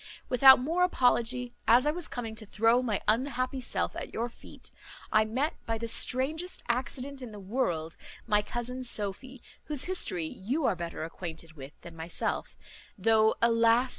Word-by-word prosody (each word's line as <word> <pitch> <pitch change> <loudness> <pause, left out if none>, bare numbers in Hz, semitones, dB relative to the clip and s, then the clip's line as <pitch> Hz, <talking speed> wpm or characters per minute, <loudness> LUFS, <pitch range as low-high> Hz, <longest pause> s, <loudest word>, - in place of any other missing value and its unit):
"Without 265 +1 +8
more 325 +8 -1
apology, 245 -6 +1
as 245 +4 +5
I 300 - +3
was 345 +1 -5
coming 230 -3 -5
to 220 0 -6
throw 225 +4 +3
my 225 -5 -1
unhappy 255 +2 0
self 245 - -1
at - - -6
your 235 +2 -3
feet, - - -13 0.4
I 215 0 +4
met, 260 +8 -1
by 225 0 -1
the 230 +1 -4
strangest 295 +10 +2
accident 260 +3 -3
in 245 -3 -8
the 210 - -9
world, 185 -7 -2 0.3
my 210 0 +3
cousin 240 +4 -5
Sophy, 240 +2 -1 0.2
whose 295 -4 -1
history 270 - -1
you 250 - -3
are - - +2
better 170 -2 -5
acquainted 165 0 -7
with 140 -1 -12
than 170 -1 -11
myself, 165 +1 -4 0.4
though, 220 +2 +3
alas! 230 +2 +4
235 Hz, 165 wpm, -29 LUFS, 210-260 Hz, 0.4 s, Without